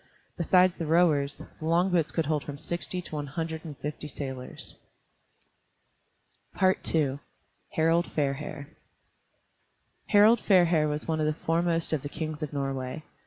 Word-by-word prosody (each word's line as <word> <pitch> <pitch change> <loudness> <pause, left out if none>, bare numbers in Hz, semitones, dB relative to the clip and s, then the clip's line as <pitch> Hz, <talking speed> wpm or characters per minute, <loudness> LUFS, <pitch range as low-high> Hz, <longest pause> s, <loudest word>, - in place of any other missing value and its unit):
Besides 180 +1 +3
the 165 - -2
rowers, 155 -4 +2 0.2
the 155 - -6
long 175 +3 +3
boats 165 -3 +2
could 165 - 0
hold 150 -1 0
from 145 -1 -7
sixty 175 +3 -3
to - - -10
one 145 -1 -3
hundred 160 +2 -4
and 150 -4 -8
fifty 150 +1 -5
sailors. 130 -3 -6 1.9
II 160 -7 +2 0.6
HARALD 165 +2 +3
FAIRHAIR 140 -1 -2 1.4
Harald 215 +3 +6
Fairhair 175 -7 +4
was 150 0 -3
one 160 -1 0
of 155 - +1
the 155 0 -2
foremost 165 0 +1
of 155 - 0
the 145 - -5
kings 155 0 -5
of 150 - -3
Norway. 135 +1 -3
155 Hz, 140 wpm, -28 LUFS, 145-170 Hz, 1.9 s, Harald